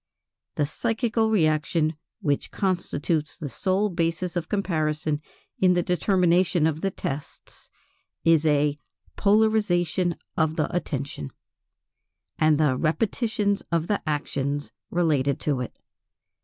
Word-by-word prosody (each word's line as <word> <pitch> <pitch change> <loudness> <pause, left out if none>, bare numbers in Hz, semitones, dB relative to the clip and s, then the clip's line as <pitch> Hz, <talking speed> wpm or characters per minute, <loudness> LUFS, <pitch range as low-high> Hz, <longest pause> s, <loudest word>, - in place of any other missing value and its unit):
The 145 - +1
psychical 225 - 0
reaction 155 -4 +2 0.3
which 145 -6 0
constitutes 170 -5 -1
the 150 -5 -5
sole 190 +7 +1
basis 170 0 -1
of 170 -2 -2
comparison 155 -6 0 0.4
in 180 -1 +4
the 175 - +2
determination 180 -2 +2
of 160 0 0
the 195 - +1
tests, 145 -6 -7 0.6
is 165 -2 +5
a 150 -1 +2 0.4
polarization 200 -5 +2 0.2
of 160 -2 +1
the 160 +2 -1
attention, 140 - -3 1.1
and 155 -1 +4
the 150 -4 +3
repetition 205 - 0
of 165 -1 +1
the 205 +3 0
actions 145 -1 -2 0.2
related 145 -6 +1
to 145 -4 0
it. 125 - -6
165 Hz, 115 wpm, -25 LUFS, 150-185 Hz, 1.1 s, is